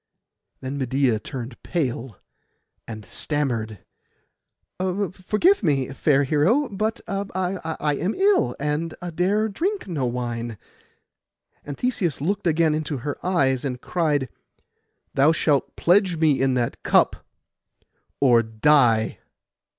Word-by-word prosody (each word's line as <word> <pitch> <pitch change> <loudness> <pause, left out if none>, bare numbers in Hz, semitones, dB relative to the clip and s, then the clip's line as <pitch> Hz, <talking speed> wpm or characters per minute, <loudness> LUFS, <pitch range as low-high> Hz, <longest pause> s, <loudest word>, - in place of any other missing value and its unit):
Then 135 +2 -4
Medeia 130 -3 +1
turned 120 +1 -7
pale, 130 - -3 0.7
and 110 -2 -8
stammered, 115 - -3 0.9
'Forgive 195 - +1
me, 140 - +1
fair 140 0 +2
hero; 160 - +2
but 215 +3 -2
I 185 -6 -2
am 185 +6 -1
ill, 385 - +2
and 150 +3 -2 0.2
dare 200 +6 +1
drink 370 - -2
no 150 -8 -1
wine.' 120 -2 -4 1.1
And 145 -1 -7
Theseus 205 - -1
looked 185 +6 -1
again 160 -1 +3
into 155 -1 -2
her 145 - -4
eyes, 135 -8 +1
and 125 -3 -3
cried, 150 -5 0 0.8
'Thou 145 +4 +4
shalt 150 -3 +1
pledge 180 -1 +3
me 155 -4 +2
in 135 -1 +2
that 120 -2 -2
cup, - - +3 1.0
or 120 -4 +5
die. 115 0 +3
150 Hz, 110 wpm, -23 LUFS, 130-185 Hz, 1.1 s, or